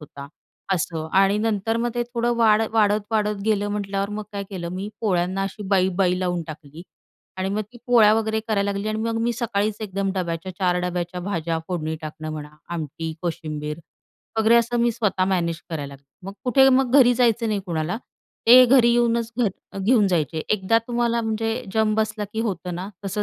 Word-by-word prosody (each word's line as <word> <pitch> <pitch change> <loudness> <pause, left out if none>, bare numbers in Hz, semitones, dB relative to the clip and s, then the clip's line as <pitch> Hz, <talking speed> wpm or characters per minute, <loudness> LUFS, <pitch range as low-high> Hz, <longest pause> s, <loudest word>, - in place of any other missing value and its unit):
होता 140 -2 -10 0.5
असं 160 -2 -3
आणि 195 +1 +3
नंतर 220 0 0
मग 240 +1 0
ते 240 - 0
थोडं 240 0 -1
वाढ 220 -2 +4
वाढत, 210 -1 +3
वाढत 210 -1 +1
गेलं 205 -2 +1
म्हटल्यावर 200 -1 -2
मग 210 +1 -4
काय 200 -1 -3
केलं 175 -3 -5
मी 190 +3 -4
पोळ्यांना 185 -2 0
अशी 195 +2 -5
बाई-बाई 185 -1 +2
लावून 180 -2 -1
टाकली. 155 0 -10 0.5
आणि 190 0 -2
मग 205 +2 -1
ती 240 - -13
पोळ्या 230 -4 +6
वगैरे 220 0 0
करायला 200 -2 +1
लागली 200 +2 -3
आणि 215 0 -2
मग 225 0 -1
मी 240 +1 +1
सकाळीच 215 -3 -1
एकदम 195 -2 -2
डब्याच्या 175 -1 -3
4 180 -2 +2
डब्याच्या 180 0 -3
भाज्या 170 -3 -2
फोडणी 160 -3 -2
टाकणं 155 0 -6
म्हणा 150 -1 -7 0.2
आमटी 160 0 -4
कोशिंबीर 155 -3 -4 0.6
वगैरे 220 +1 +5
असं 235 +1 +2
मी 240 0 +3
स्वतः 210 -5 0
मॅनेज 175 -3 -1
करायला 150 -4 -3
लागले. 140 +1 -18 0.2
मग 195 - -5
कुठे 265 +2 +5
मग 260 -1 +3
घरी 245 -2 +6
जायचं 230 -2 +2
नाही 210 -2 0
कुणाला 165 +3 -2 0.5
ते 250 +2 +9
घरी 245 -1 +5
येऊनच 235 -1 +1
घर 200 -3 -3
घेऊन 210 +2 +3
जायचे 160 -3 0
एकदा 215 +2 +2
तुम्हाला 235 -1 0
म्हणजे 225 +2 -2
जम 220 0 +2
बसला 215 -1 -1
की 220 - -2
होतं 180 -5 -3
ना, 180 +3 -5 0.2
तसं 195 +2 -1
200 Hz, 185 wpm, -23 LUFS, 180-225 Hz, 0.6 s, ते